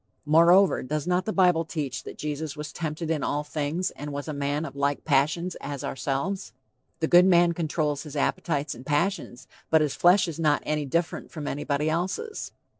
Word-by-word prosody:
Moreover, 170 Hz, +5 st, +5 dB
does 150 Hz, +3 st, -3 dB
not 180 Hz, +1 st, +1 dB
the 220 Hz, -, -1 dB
bible 180 Hz, -5 st, +3 dB
teach 150 Hz, -5 st, -4 dB
that -, -, -8 dB
Jesus 150 Hz, 0 st, -4 dB
was 150 Hz, 0 st, -6 dB
tempted 160 Hz, 0 st, -3 dB
in 155 Hz, -3 st, 0 dB
all 145 Hz, +1 st, -1 dB
things, 150 Hz, +4 st, -2 dB
and 145 Hz, +1 st, -7 dB
was 145 Hz, +1 st, -5 dB
a 155 Hz, -, -3 dB
man 145 Hz, +2 st, -1 dB
of 140 Hz, -, -8 dB
like 140 Hz, 0 st, -1 dB
passions, 155 Hz, +5 st, +1 dB
as 140 Hz, -2 st, -5 dB
ourselves? 140 Hz, +9 st, -3 dB, 0.5 s
The 160 Hz, -, +2 dB
good 175 Hz, +2 st, +6 dB
man 175 Hz, -2 st, +5 dB
controls 155 Hz, -3 st, -1 dB
his 150 Hz, -2 st, -9 dB
appetites 150 Hz, 0 st, -1 dB
and 120 Hz, -, -11 dB
passions, 145 Hz, -3 st, -1 dB, 0.2 s
but 160 Hz, -1 st, +5 dB
his 150 Hz, -3 st, 0 dB
flesh 180 Hz, +2 st, +4 dB
is 165 Hz, -1 st, -6 dB
not 150 Hz, -2 st, +2 dB
any 150 Hz, -2 st, -1 dB
different 170 Hz, +4 st, -2 dB
from 150 Hz, -3 st, -6 dB
anybody 145 Hz, +1 st, -1 dB
else's. 185 Hz, -, -2 dB
155 Hz, 190 wpm, -26 LUFS, 145-175 Hz, 0.5 s, good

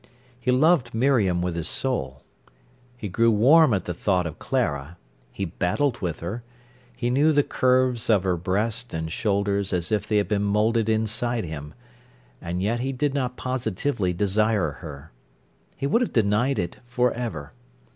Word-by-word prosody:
He 125 Hz, -, -3 dB
loved 130 Hz, -2 st, +3 dB
Miriam 110 Hz, -9 st, +2 dB
with 90 Hz, -1 st, -1 dB
his 85 Hz, -1 st, -2 dB
soul. 65 Hz, -, -2 dB, 0.7 s
He 110 Hz, -, -5 dB
grew 115 Hz, +5 st, +2 dB
warm 130 Hz, +8 st, +6 dB
at 100 Hz, -3 st, 0 dB
the 90 Hz, -, -3 dB
thought 90 Hz, 0 st, 0 dB
of 80 Hz, -, -6 dB
Clara, 70 Hz, +4 st, -2 dB, 0.3 s
he 100 Hz, -, -3 dB
battled 115 Hz, -, -1 dB
with 85 Hz, -4 st, -3 dB
her, 100 Hz, +8 st, -4 dB, 0.6 s
he 120 Hz, 0 st, -1 dB
knew 145 Hz, +5 st, +4 dB
the 145 Hz, -1 st, +3 dB
curves 130 Hz, -3 st, +1 dB
of 105 Hz, -5 st, +4 dB
her 95 Hz, -2 st, +1 dB
breast 105 Hz, +6 st, -2 dB
and 80 Hz, 0 st, -3 dB
shoulders 100 Hz, 0 st, 0 dB
as 90 Hz, 0 st, -1 dB
if 105 Hz, -2 st, 0 dB
they 105 Hz, -, +2 dB
had 100 Hz, -, +1 dB
been 100 Hz, 0 st, 0 dB
moulded 105 Hz, +2 st, +1 dB
inside 110 Hz, +1 st, 0 dB
him; 75 Hz, -2 st, -7 dB, 0.7 s
and 90 Hz, +2 st, -3 dB
yet 115 Hz, +4 st, 0 dB
he 130 Hz, +2 st, -1 dB
did 135 Hz, +2 st, -1 dB
not 125 Hz, -3 st, -2 dB
positively 120 Hz, -4 st, -1 dB
desire 100 Hz, -1 st, +1 dB
her. 75 Hz, -2 st, -9 dB, 0.6 s
He 135 Hz, -, -4 dB
would 230 Hz, -, +2 dB
have 250 Hz, -, -1 dB
denied 115 Hz, +5 st, +2 dB
it 85 Hz, -1 st, -3 dB
for 125 Hz, 0 st, +1 dB
ever. 110 Hz, -12 st, -5 dB
110 Hz, 165 wpm, -24 LUFS, 90-125 Hz, 0.7 s, warm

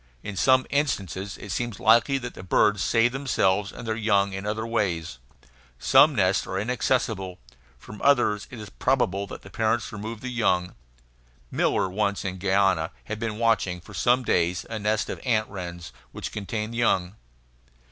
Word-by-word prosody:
In 105 Hz, -, -6 dB
some 130 Hz, +7 st, +4 dB
instances 100 Hz, -, -1 dB
it 100 Hz, -, -8 dB
seems 120 Hz, -1 st, -3 dB
likely 120 Hz, +3 st, +4 dB
that 125 Hz, -2 st, -6 dB
the -, -, -10 dB
birds 105 Hz, +2 st, +2 dB
save 115 Hz, +1 st, +3 dB
themselves 105 Hz, -7 st, +1 dB
and 115 Hz, -, -9 dB
their 110 Hz, -, 0 dB
young 100 Hz, -3 st, +2 dB
in 95 Hz, +1 st, -5 dB
other 110 Hz, +1 st, -2 dB
ways. 90 Hz, -, -2 dB, 0.6 s
Some -, -, +5 dB
nests -, -, +2 dB
are 95 Hz, -, -3 dB
inaccessible. 110 Hz, -4 st, -1 dB, 0.4 s
From 105 Hz, +11 st, -12 dB
others 120 Hz, -7 st, +3 dB
it 125 Hz, -4 st, -9 dB
is 105 Hz, -2 st, -9 dB
probable 95 Hz, +10 st, 0 dB
that -, -, -9 dB
the 100 Hz, -, -13 dB
parents 110 Hz, +2 st, 0 dB
remove 110 Hz, +1 st, -6 dB
the 130 Hz, -, -4 dB
young. 90 Hz, -7 st, +1 dB, 0.8 s
Miller -, -, +1 dB
once, 100 Hz, +2 st, -1 dB
in 95 Hz, -1 st, -4 dB
Guiana, 95 Hz, -3 st, +2 dB
had 110 Hz, 0 st, -5 dB
been 110 Hz, -2 st, -3 dB
watching 115 Hz, -6 st, +1 dB
for 95 Hz, +5 st, -14 dB
some 120 Hz, +7 st, +2 dB
days 85 Hz, -5 st, +1 dB
a 110 Hz, -, -3 dB
nest 105 Hz, +1 st, 0 dB
of -, -, -6 dB
ant 110 Hz, -4 st, +1 dB
wrens 85 Hz, -7 st, -7 dB, 0.2 s
which -, -, -5 dB
contained 110 Hz, +2 st, -4 dB
young. 95 Hz, -6 st, +1 dB
105 Hz, 165 wpm, -25 LUFS, 95-115 Hz, 0.8 s, Some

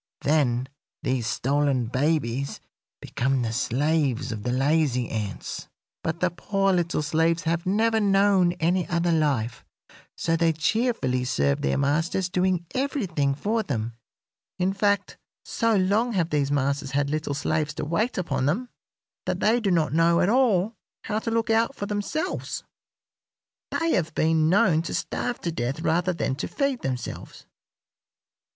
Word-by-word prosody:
Then 130 Hz, -4 st, +2 dB, 0.4 s
these 125 Hz, -3 st, 0 dB
stolen 140 Hz, -1 st, +1 dB
babies 135 Hz, 0 st, -1 dB, 0.4 s
become 130 Hz, 0 st, 0 dB
the 115 Hz, -1 st, -2 dB
slaves 135 Hz, 0 st, 0 dB
of 105 Hz, -2 st, -5 dB
the 120 Hz, -, -2 dB
lazy 135 Hz, -2 st, +1 dB
ants; 105 Hz, -3 st, -5 dB, 0.4 s
but 160 Hz, +2 st, -3 dB
the 180 Hz, -1 st, +2 dB
poor 195 Hz, +2 st, 0 dB
little 170 Hz, -3 st, 0 dB
slaves 160 Hz, +2 st, +1 dB
have 170 Hz, +2 st, -1 dB
never 220 Hz, +3 st, +2 dB
known 195 Hz, -3 st, +3 dB
any 175 Hz, +2 st, 0 dB
other 170 Hz, 0 st, +1 dB
life, 140 Hz, -8 st, 0 dB, 0.5 s
so 165 Hz, -, +1 dB
they 165 Hz, -1 st, +2 dB
cheerfully 160 Hz, -, 0 dB
serve 70 Hz, -, +1 dB
their 70 Hz, -, +1 dB
masters, 165 Hz, +6 st, 0 dB
doing 180 Hz, -2 st, +1 dB
everything 190 Hz, -, 0 dB
for 220 Hz, +9 st, 0 dB
them; 120 Hz, -, -3 dB, 0.6 s
in 185 Hz, +1 st, +1 dB
fact, 200 Hz, 0 st, 0 dB, 0.3 s
so 230 Hz, -3 st, +1 dB
long 205 Hz, +5 st, +2 dB
have 175 Hz, -4 st, 0 dB
these 145 Hz, -2 st, +1 dB
masters 140 Hz, 0 st, 0 dB
had 140 Hz, 0 st, +1 dB
little 155 Hz, -2 st, -2 dB
slaves 155 Hz, +1 st, -1 dB
to -, -, -3 dB
wait 210 Hz, +10 st, 0 dB
upon 145 Hz, -7 st, -1 dB
them 240 Hz, -, -1 dB, 0.6 s
that -, -, -1 dB
they 225 Hz, +3 st, +3 dB
do 215 Hz, -4 st, 0 dB
not 165 Hz, -5 st, +2 dB
know 165 Hz, +1 st, +4 dB
at 180 Hz, -, +3 dB
all 225 Hz, -4 st, +3 dB, 0.3 s
how 215 Hz, 0 st, -1 dB
to 230 Hz, -, -3 dB
look 230 Hz, 0 st, 0 dB
out 230 Hz, +4 st, +2 dB
for 205 Hz, -, -4 dB
themselves. 210 Hz, -, -3 dB, 1.1 s
They 330 Hz, 0 st, 0 dB
have 165 Hz, -2 st, 0 dB
been 160 Hz, 0 st, +3 dB
known 175 Hz, -3 st, +4 dB
to 170 Hz, -, -4 dB
starve 245 Hz, -1 st, -2 dB
to 170 Hz, -, -2 dB
death 135 Hz, +1 st, -3 dB
rather 175 Hz, +2 st, +1 dB
than 165 Hz, -6 st, -1 dB
to -, -, -3 dB
feed 275 Hz, -3 st, -1 dB
themselves." 130 Hz, -2 st, -5 dB
165 Hz, 150 wpm, -25 LUFS, 140-195 Hz, 1.1 s, know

